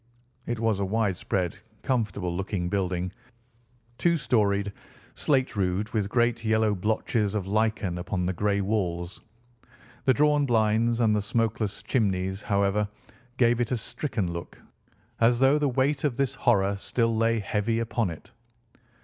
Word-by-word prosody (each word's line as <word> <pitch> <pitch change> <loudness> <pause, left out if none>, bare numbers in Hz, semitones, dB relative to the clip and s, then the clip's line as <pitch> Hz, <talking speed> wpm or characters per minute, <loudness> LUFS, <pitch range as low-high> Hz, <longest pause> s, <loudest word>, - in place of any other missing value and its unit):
It 120 -1 -2
was 110 -3 +1
a - - 0
widespread, 95 -3 -1 0.2
comfortable 105 -8 -1
looking 95 -1 -2
building, 90 -2 -1 0.9
two 170 -1 +3
storied, 100 -7 +1 0.4
slate 135 -5 +1
roofed, 100 +2 -1
with 105 -3 0
great 120 0 +1
yellow 110 -1 +2
blotches 105 +1 0
of 100 -3 -1
lichen 105 -3 0
upon 90 0 -2
the 95 - 0
grey 100 +2 0
walls. 90 -4 -2 0.8
The 130 - +5
drawn 150 -1 +3
blinds 115 0 +2
and 110 -2 +3
the 105 - +1
smokeless 110 -1 -1
chimneys, 95 -4 0
however, 100 0 +1 0.5
gave 120 -1 +3
it 120 - -1
a 125 - +1
stricken 105 - -3
look, 85 0 -8 0.6
as 120 +1 +4
though 135 +4 +4
the 145 -1 +1
weight 135 +2 +1
of 140 -5 0
this 135 -1 +1
horror 100 -6 +2
still 115 +2 0
lay 115 +1 +2
heavy 105 +2 -1
upon 115 -2 0
it. 80 - -10
110 Hz, 145 wpm, -27 LUFS, 95-120 Hz, 0.9 s, The